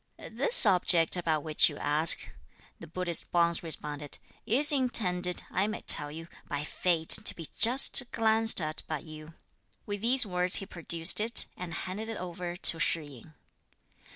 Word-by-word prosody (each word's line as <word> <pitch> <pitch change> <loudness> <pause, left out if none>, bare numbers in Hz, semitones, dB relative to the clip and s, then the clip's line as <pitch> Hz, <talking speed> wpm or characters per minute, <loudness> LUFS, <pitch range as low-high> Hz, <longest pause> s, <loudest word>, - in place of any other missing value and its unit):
"This 480 - +5
object 180 -4 +1
about 160 -4 -3
which 155 0 +3
you 145 - -11
ask," 150 +3 +2 0.5
the 165 - -13
Buddhist 175 +1 -5
Bonze 170 -1 -1
responded, 150 -3 -7 0.3
"is 285 +7 0
intended, 185 -10 -2
I 190 +3 -2
may 215 - -7
tell 145 0 +5
you, 165 +2 -11 0.2
by 145 0 -6
fate 160 +1 -4
to - - -1
be 165 -3 -11
just 245 +1 +5
glanced 225 -1 +1
at 155 -2 -6
by 155 - -5
you." 155 +1 -14 0.5
With 205 -1 -7
these 250 +3 +3
words 180 -2 -1
he 195 - -2
produced 170 -2 +3
it, 225 +2 +2
and 175 -3 -9
handed 205 +4 -8
it 225 - -7
over 175 -1 -8
to 165 -3 0
Shih 165 0 -1
yin. 145 +2 -17
175 Hz, 160 wpm, -27 LUFS, 160-210 Hz, 0.5 s, This